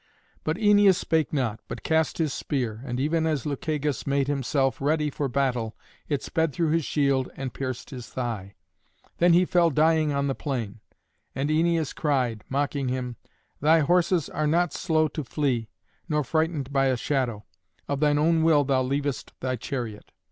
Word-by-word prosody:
But 155 +2 -1
Æneas 205 -2 +5
spake 160 -3 0
not, 120 -7 -1
but - - -7
cast 160 -1 +1
his 155 -4 0
spear, 120 -6 -3
and 125 -1 -3
even 160 +3 +1
as 150 -6 -1
Lucagus 150 0 -2
made 140 0 +1
himself 135 -2 0
ready 150 +1 +1
for 140 0 -2
battle 125 -4 -1 0.3
it 145 -3 -1
sped 160 -3 0
through 165 0 0
his 165 0 +2
shield 140 -3 +1
and 135 -2 -5
pierced 130 -3 -5
his 125 -4 -7
thigh. 110 -6 -4 0.6
Then 175 0 +5
he 180 +2 +5
fell 175 -1 +3
dying 155 +1 +3
on 140 0 0
the 135 - 0
plain. 120 -8 -4 0.6
And 140 +3 -1
Æneas 165 -1 +1
cried, 125 -7 0
mocking 140 0 -1
him, 125 -2 -3 0.4
"Thy 160 +2 +4
horses 175 +1 +2
are 155 - -1
not 170 +1 +2
slow 155 -3 +1
to 150 +2 -4
flee, 125 -4 -1 0.4
nor 150 -1 +1
frightened 155 -1 -1
by 135 -1 +3
a 130 -1 +1
shadow. 120 -6 -1 0.4
Of 140 -1 -1
thine 150 -1 +3
own 160 +2 +3
will 160 -3 +4
thou 135 -1 +2
leavest 140 +1 -2
thy 130 -1 -1
chariot." 120 -3 -5
145 Hz, 170 wpm, -26 LUFS, 130-160 Hz, 0.6 s, Æneas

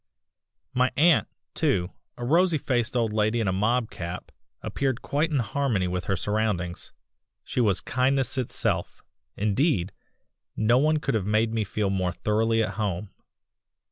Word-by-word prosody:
"My 125 +1 +2
aunt, 165 +3 +5 0.3
too 100 - 0 0.3
a 120 - -4
rosy 170 +4 +3
faced 120 -3 0
old 115 -3 0
lady 110 +2 +1
in 110 - 0
a 95 - +1
mob 110 +4 +1
cap 85 +1 -6 0.3
appeared 135 -3 -2
quite 150 +4 0
in 150 - 0
harmony 120 -6 0
with 90 0 -3
her 95 - 0
surroundings. 100 -3 -2 0.5
She 125 - -1
was 100 -5 +3
kindness 130 +1 +1
itself 130 -3 -1 0.3
indeed, 105 - +1 0.6
no 120 +3 +3
one 155 +2 +3
could 140 -2 -2
have 105 -4 -1
made 110 +1 +2
me 110 -1 0
feel 100 0 -1
more 95 -2 0
thoroughly 110 +1 +1
at - - -4
home. 100 -1 -2
115 Hz, 150 wpm, -26 LUFS, 100-130 Hz, 0.6 s, aunt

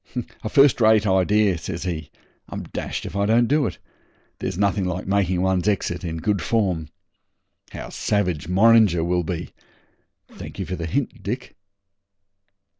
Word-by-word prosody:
'A 110 - -2
first 140 -1 +5
rate 110 -1 +5
idea,' 95 -1 +3
says 85 +1 -5
he. 80 -5 -4 0.4
'I'm - - -5
dashed - - -5
if - - -7
I 100 0 +1
don't 115 +2 +4
do 145 +1 +2
it. - - -6 0.6
There's - - -3
nothing 100 0 +1
like 90 0 -3
making 95 -2 +1
one's 95 0 +1
exit 90 -3 -1
in 80 -2 -3
good 100 +3 0
form. 90 -4 0 0.8
How - - -7
savage 90 -7 -1
Morringer 100 -2 +5
will 90 +1 0
be! 85 +1 -5 0.7
Thank - - -10
you - - -3
for 90 - -4
the 85 -2 -4
hint, 130 - -2
Dick.' 120 +6 -5
95 Hz, 155 wpm, -23 LUFS, 90-110 Hz, 0.8 s, first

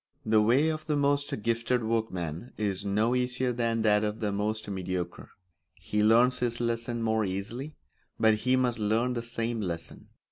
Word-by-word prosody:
The 110 0 +4
way 130 +9 +4
of 155 0 -4
the 150 - +1
most 140 -5 0
gifted 115 +2 0
workman 110 - -2
is 100 -2 -1
no 105 +4 +1
easier 125 0 0
than 115 -1 0
that 105 -1 +4
of 105 +1 -2
the 105 -3 -1
most 105 +2 -2
mediocre; 95 -2 -4 0.5
he 105 - -2
learns 120 +4 +4
his 120 -1 -1
lesson 115 0 -2
more 110 -1 +1
easily, 110 +10 -4 0.4
but 110 0 +5
he 125 +4 +1
must 125 -2 +1
learn 110 +4 +1
the 120 - -2
same 115 0 -3
lesson. 85 -4 -5
115 Hz, 170 wpm, -28 LUFS, 105-125 Hz, 0.5 s, but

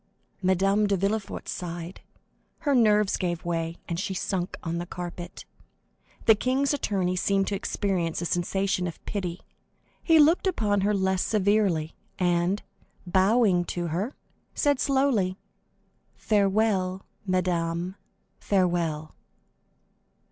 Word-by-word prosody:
Madame 195 +3 +2
de 200 -1 +1
Villefort 200 +2 -2
sighed; 175 0 -6 0.6
her 290 -3 +1
nerves 210 -5 +4
gave 175 -3 -2
way, 165 -1 -2
and 170 -1 -3
she 195 0 -3
sunk 180 -1 -2
on 170 0 -2
the 175 - -4
carpet. 175 0 -7 0.8
The 225 - +8
king's 260 +6 +1
attorney 190 -9 0
seemed 195 +1 +1
to 205 - -1
experience 185 -4 -1
a 170 - -3
sensation 185 +2 0
of 165 - -9
pity; 180 -4 -4 0.6
he 325 -2 +4
looked 315 +5 +5
upon 210 - +1
her 205 +1 +2
less 190 -1 +1
severely, 200 -6 +1 0.2
and, 175 +2 +1 0.4
bowing 190 +1 +3
to 175 -1 -3
her, 195 - -2 0.4
said 285 -3 +2
slowly: 265 -10 +1 0.8
"Farewell, 195 -2 +1 0.2
madame, 175 -1 0 0.5
farewell!" 170 -5 0
190 Hz, 115 wpm, -26 LUFS, 175-210 Hz, 0.8 s, The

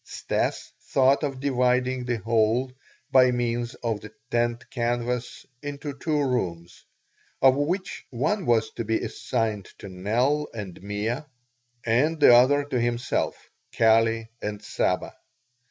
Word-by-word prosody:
Stas - - -2
thought 135 +2 +3
of 135 -3 -2
dividing 125 -1 +1
the 120 -1 -1
whole, 115 +4 +1 0.4
by 130 -1 +6
means 120 -1 -1
of 115 -3 -1
the 110 - -10 0.2
tent 120 0 0
canvas, 120 0 -2 0.2
into 145 0 -5
two 155 +2 -1
rooms, 85 -9 -3 0.6
of 130 0 +6
which 175 +7 -2
one 155 - -1
was 110 -2 +2
to 115 - -4
be 110 0 0
assigned 110 -5 -2
to 100 - -9
Nell 120 +11 0
and 100 -6 -7
Mea 105 +5 -2 0.7
and 140 +8 +2
the 145 - +8
other 135 +4 +5
to 135 -4 -1
himself, 120 +1 -1 0.4
Kali, 115 0 +3
and 105 0 -4
Saba. - - -1
120 Hz, 130 wpm, -25 LUFS, 115-135 Hz, 0.7 s, the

